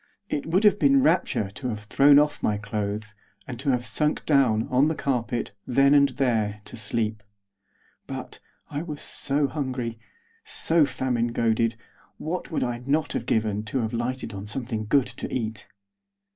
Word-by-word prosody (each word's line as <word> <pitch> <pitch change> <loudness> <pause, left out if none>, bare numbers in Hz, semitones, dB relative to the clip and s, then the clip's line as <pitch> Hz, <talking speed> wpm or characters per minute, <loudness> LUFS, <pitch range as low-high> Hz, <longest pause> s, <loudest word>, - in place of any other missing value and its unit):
It 145 - -2
would 180 +6 +2
have 205 -1 +5
been 275 +1 +5
rapture 155 - +1
to 125 +6 -6
have 105 -3 -4
thrown 140 +6 +5
off 150 0 +2
my 105 - +1
clothes, 105 0 -4 0.3
and 125 -3 -6
to 140 - -1
have 125 -2 +1
sunk 150 +3 0
down, 125 -7 +3
on 130 +4 +4
the 160 - 0
carpet, 120 -4 -2 0.2
then 140 +3 +4
and 140 -1 +5
there, 110 -5 0
to - - -8
sleep. 110 -1 -2 0.9
But, - - -7 0.3
I 145 0 -2
was 155 -4 -6
so 145 +1 0
hungry, 130 -6 -3 0.4
so 160 -3 +3
famine 130 -3 -1
goaded; 115 -1 +1 0.4
what 175 +3 -4
would 160 - -1
I 120 -1 -2
not 150 +2 +1
have - - -3
given 110 -2 +1
to 125 +4 -1
have 110 0 -3
lighted 120 0 -3
on 100 +1 -7
something 115 -2 -3
good 135 +3 +3
to - - -7
eat! 110 -4 -4
125 Hz, 170 wpm, -25 LUFS, 110-145 Hz, 0.9 s, have